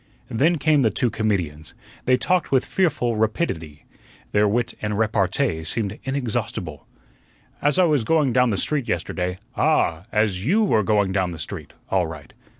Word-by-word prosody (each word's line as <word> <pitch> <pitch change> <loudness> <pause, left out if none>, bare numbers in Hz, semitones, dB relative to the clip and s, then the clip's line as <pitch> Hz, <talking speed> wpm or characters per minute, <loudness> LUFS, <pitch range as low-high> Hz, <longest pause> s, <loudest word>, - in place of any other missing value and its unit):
Then 155 +9 +2
came 150 -1 +3
the 115 - +4
two 120 +2 0
comedians. 90 -8 -2 0.3
They 130 0 +4
talked 180 +4 0
with 130 -2 +3
fearful 130 - 0
rapidity; 95 - -2 0.5
their 105 0 +3
wit 120 +3 0
and 105 -1 -2
repartee 105 - +1
seemed 100 +4 -3
inexhaustible. 110 - -3 0.7
"As 145 +4 +2
I 185 - +5
was 150 -8 +2
going 150 -1 +2
down 125 -1 +4
the 100 - 0
street 145 +1 0
yesterday 90 +1 -2
" 125 - -35
"Ah! 90 - +1
as 105 -4 +1
YOU 200 - +3
were 110 - +3
going 100 -2 +2
down 95 -2 0
the 85 - -7
street 75 - -7 0.2
all 95 -3 +2
right." 80 -4 -10
110 Hz, 165 wpm, -23 LUFS, 95-135 Hz, 0.7 s, I